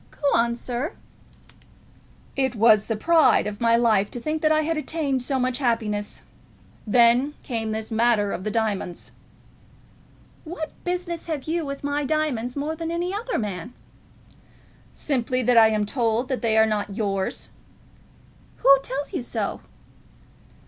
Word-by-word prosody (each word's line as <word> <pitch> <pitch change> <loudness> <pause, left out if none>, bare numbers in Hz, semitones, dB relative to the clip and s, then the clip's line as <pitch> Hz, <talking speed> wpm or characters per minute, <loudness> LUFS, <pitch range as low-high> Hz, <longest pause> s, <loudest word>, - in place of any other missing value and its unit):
"Go 285 - -1
on, 235 +1 +2
sir." 250 - -4 1.4
"It 265 -2 0
was 215 -1 +5
the 225 - -1
pride 325 +8 +4
of 210 +1 -5
my 230 0 +4
life 220 -4 +3
to 245 - -6
think 310 +5 -3
that 310 - +3
I 310 0 +3
had 325 +1 -1
attained 305 -3 -1
to 250 - -8
so 270 -2 0
much 255 0 -1
happiness. 220 -5 -2 0.6
Then 245 +6 +4
came 225 -3 -3
this 220 +1 -4
matter 220 -3 +2
of 180 - -4
the 215 - -2
diamonds." 210 -5 -2 1.3
"What 320 -1 -6
business 355 -2 -3
have 305 -5 -3
you 330 +1 -2
with 275 0 -6
my 285 +1 -1
diamonds, 275 -5 -1
more 295 +3 -2
than 330 0 -4
any 345 +2 -2
other 465 +4 -2
man?" 210 +2 -5 1.2
"Simply 255 -2 -1
that 245 +1 +3
I 225 -1 +8
am 215 -1 0
told 230 +1 0
that 260 - -2
they 225 -2 +1
are 220 - +6
not 210 -2 -2
yours." 195 -3 -2 1.1
"Who 275 0 +6
tells 275 +2 -5
you - - -2
so?" 240 - -3
245 Hz, 155 wpm, -24 LUFS, 220-300 Hz, 1.4 s, I